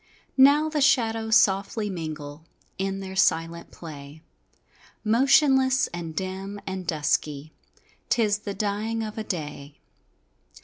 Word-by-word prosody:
Now 285 +3 +6
the 305 -1 -1
shadows 225 -5 +2
softly 200 +2 +2
mingle 155 -5 -6 0.4
In 195 0 -2
their 190 0 -7
silent 165 -2 +1
play, 150 -1 -11 0.8
Motionless 265 +3 +4
and 165 -2 -6
dim 190 +2 -5
and 190 -2 -5
dusky, 150 -1 -1 0.6
'Tis 210 -3 +2
the 200 -1 -6
dying 215 +2 -2
of 215 0 -6
a - - -3
day. 150 -7 -6
195 Hz, 115 wpm, -25 LUFS, 165-225 Hz, 0.8 s, Now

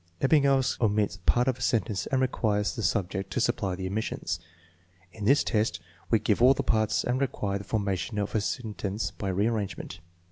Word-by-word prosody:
Ebbinghaus 135 -3 +3
omits 105 -3 +1
parts 120 +1 +4
of 130 -2 0
a - - -11
sentence 105 -5 0
and 135 - +1
requires 105 -5 0
the 115 - -4
subject 95 0 -1
to - - -1
supply 95 -2 0
the 95 +1 -5
omissions. 105 +4 -3 0.7
In 105 -2 -6
this 140 +6 +5
test 105 -6 0 0.3
we 115 - +5
give 110 0 0
all 130 +2 +7
the - - -1
parts 110 -1 +1
and 125 +2 0
require 100 -7 -1
the - - -8
formation 100 0 -2
of 100 -1 -2
a 110 - +1
sentence 105 -2 -3
by 100 - -4
rearrangement. 100 -2 -2
105 Hz, 180 wpm, -28 LUFS, 100-120 Hz, 0.7 s, all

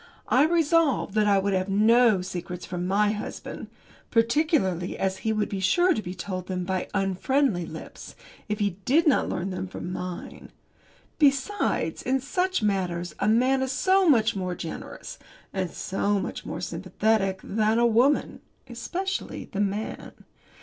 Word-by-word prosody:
I 270 +4 +5
resolved 325 - +2
that 215 -1 +2
I 200 -1 +4
would 195 +1 +1
have 185 +1 0
no 215 0 +4
secrets 180 -1 -6
from 180 0 -4
my 205 +2 +2
husband 210 -1 -6 0.4
particularly 230 - +1
as 190 0 -1
he 220 - -1
would 215 -1 0
be 195 - -4
sure 350 - +3
to 220 - -2
be 180 -2 -6
told 185 0 -5
them 185 -1 -2
by 185 0 -2
unfriendly 195 - +1
lips 160 - -10 0.3
if 210 - -1
he 200 -4 -1
did 310 - +3
not 295 - +3
learn 185 +2 -3
them 185 0 -4
from 180 0 -6
mine. 180 -1 -7 0.7
Besides, 285 +7 +1
in 265 +1 +1
such 360 - -1
matters, 180 -4 -1
a - - +1
man 255 +5 +3
is 265 -1 -1
so 375 +4 +3
much 225 -6 +4
more 185 -2 -3
generous, 165 - -7 0.3
and 185 -2 -1
so 200 +4 -1
much 185 - -5
more - - -5
sympathetic 195 -3 0
than 215 +2 +1
a 235 - +4
woman 240 +5 +2 0.3
especially 355 +12 -4
the 200 - -4
man. 205 +2 -3
210 Hz, 155 wpm, -26 LUFS, 185-265 Hz, 0.7 s, I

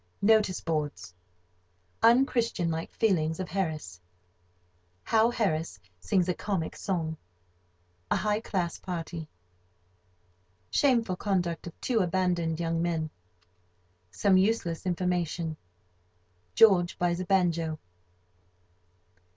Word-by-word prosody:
—"Notice" 210 -3 +3
boards.—Unchristianlike 145 - -1
feelings 160 -7 +1
of 185 - -4
Harris.—How 90 - -4
Harris 165 - -1 0.2
sings 170 - +1
a 180 - +1
comic 190 -4 -3
song.—A 90 - -6
high 210 0 0
class 185 -6 -2
party.—Shameful 90 - -4
conduct 180 -5 -1
of 170 - -10
two 240 -3 +1
abandoned 175 -3 0
young 165 -1 -1
men.—Some 90 - -3
useless 190 -3 0
information.—George 150 - 0
buys 175 0 0
a 185 - -3
banjo. 170 -4 +1
160 Hz, 75 wpm, -28 LUFS, -, 0.2 s, Notice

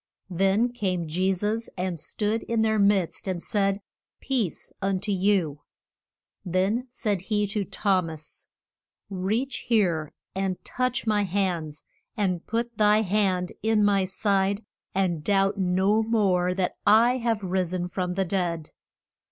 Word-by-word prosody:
Then 195 +6 +2
came 185 -8 -2
Je 185 +5 +1
sus 210 +5 -2
and 180 -2 -2
stood 215 +7 -1
in 230 -1 +1
their 220 -1 +2
midst 200 -3 +2
and 180 -2 -2
said, 200 -1 0 0.4
Peace 245 - -1
be - - -28
un 195 -1 0
to 205 +1 -1
you. 185 -7 +1 0.8
Then 195 +7 0
said 210 -6 -2
he 210 +1 0
to 205 0 -2
Thom 190 -3 0
as, 155 -1 -8 0.6
Reach 215 +8 -1
here 175 -10 +2 0.2
and 190 -1 -1
touch 255 0 -1
my 210 -2 +2
hands, 175 -6 -2 0.3
and 185 -5 0
put 230 0 -2
thy 210 +1 +5
hand 190 -3 +1
in 220 -1 +3
my 200 -2 +3
side, 195 +1 0 0.3
and 175 -5 0
doubt 195 +1 +2
no 190 +4 +2
more 190 -5 +2
that 185 -1 -1
I 230 +4 +5
have 230 -4 -1
ris 185 -1 0
en 180 -1 -2
from 180 0 -3
the 195 0 +1
dead. 170 -4 -2
195 Hz, 145 wpm, -26 LUFS, 180-215 Hz, 0.8 s, thy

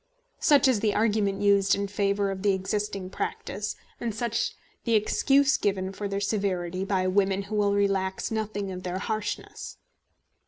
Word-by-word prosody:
Such 285 -2 +5
is 255 -5 +3
the 210 -1 +1
argument 210 -3 +1
used 200 -1 +4
in 200 0 -2
favour 200 0 0
of 190 -1 -5
the 200 0 +3
existing 195 0 -2
practice, 205 +2 -4 0.2
and 230 -3 -3
such 230 0 -1 0.3
the 230 -2 +2
excuse 275 +6 +3
given 190 -1 -1
for 205 +1 -4
their 200 0 -2
severity 190 -3 -1
by 190 -1 0
women 195 +1 +2
who 205 +2 -5
will 205 -1 +2
relax 195 -1 0
nothing 210 -3 -2
of 185 0 -6
their 180 0 -3
harshness. 215 +1 -4
200 Hz, 160 wpm, -27 LUFS, 195-210 Hz, 0.3 s, Such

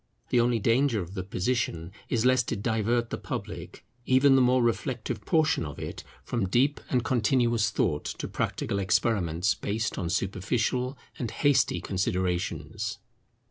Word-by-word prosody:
The 125 - +3
only 120 0 +3
danger 115 +2 +2
of 90 0 -6
the 95 - -3
position 90 -3 -2 0.2
is 120 -1 +1
lest 130 -2 +3
it 100 - -3
divert 115 +1 0
the - - -3
public, - - -6 0.2
even 135 +1 +5
the 135 - +5
more 125 0 +4
reflective 120 0 -1
portion 160 - +2
of 75 -2 -6
it, - - -6 0.2
from 115 -7 -2
deep 135 +8 +2
and 125 -2 +1
continuous 120 -3 +2
thought, 75 -8 0
to - - -4
practical 100 - -2
experiments 95 -2 +1
based 105 +1 -2
on 85 -3 -2
superficial 115 - -1 0.2
and 120 - -2
hasty 140 +5 +2
considerations. 95 +2 -2
115 Hz, 145 wpm, -28 LUFS, 95-125 Hz, 0.2 s, even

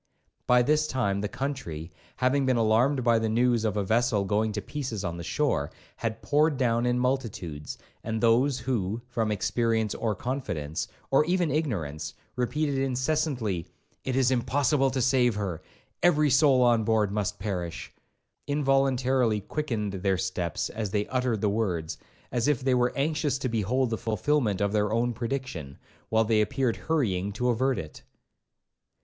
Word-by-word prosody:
By 125 0 +5
this 150 +3 +2
time 100 -8 0
the 105 - -1
country, 100 - -5 0.2
having 130 +2 +2
been 130 -2 +3
alarmed 120 +5 +3
by 115 -1 +4
the 110 0 -1
news 120 0 +2
of 105 -2 0
a 100 - +1
vessel 110 0 +1
going 105 +2 +1
to 105 - -2
pieces 125 -8 -4
on 85 -2 -3
the 85 - -6
shore, 105 - 0 0.3
had 115 -1 -4
poured 150 0 +2
down 120 -2 +1
in 125 0 +2
multitudes; 115 - -2 0.3
and 110 0 -2
those 120 +4 +3
who, 120 -4 -2
from 115 -3 -1
experience 110 +1 0
or 110 -3 -1
confidence, 90 - -3 0.2
or 135 +2 +5
even 175 -2 +1
ignorance, 80 - -2 0.2
repeated 140 +3 0
incessantly, 130 - -1 0.4
'it 130 - -2
is 130 -1 +3
impossible 135 +3 +2
to 130 -1 -1
save 125 -3 +3
her,—every 145 - -1
soul 135 -2 +5
on 120 -2 +4
board 110 -2 +2
must 105 -2 -2
perish,' 90 -4 -4 0.5
involuntarily 135 -5 +2
quickened 110 -5 -3
their 95 0 0
steps 90 -2 -2
as 110 -2 -3
they 105 +1 0
uttered 125 -4 0
the 105 - +2
words, 95 -7 -2 0.3
as 120 +1 0
if 145 -4 +1
they 130 -1 +2
were 125 0 +2
anxious 150 0 0
to 135 - -2
behold 120 +2 0
the 115 - -2
fulfilment 110 -1 0
of 100 0 +1
their 105 0 +1
own 120 +2 +1
prediction, 115 - -4 0.3
while 110 0 +3
they 110 -1 +3
appeared 120 +2 0
hurrying 105 - -1
to 125 +5 -1
avert 130 +2 +1
it. 80 -1 -7
120 Hz, 160 wpm, -27 LUFS, 105-135 Hz, 0.5 s, By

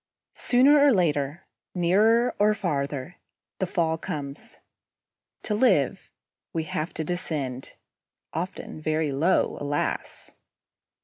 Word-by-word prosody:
Sooner 270 +4 +4
or 285 0 +6
later, 155 - 0 0.3
nearer 215 +8 +3
or 210 +1 +4
farther, 145 -5 -3 0.4
the 190 - 0
fall 165 -3 0
comes. 140 -3 -6 0.8
To 210 - -2
live, 205 - +2 0.4
we 165 - -1
have 155 +1 -3
to 160 - -2
descend, 150 -6 -4 0.6
often 170 -2 -5
very 155 -1 0
low, 155 +7 +1
alas! 145 0 -3
165 Hz, 105 wpm, -26 LUFS, 145-200 Hz, 0.8 s, or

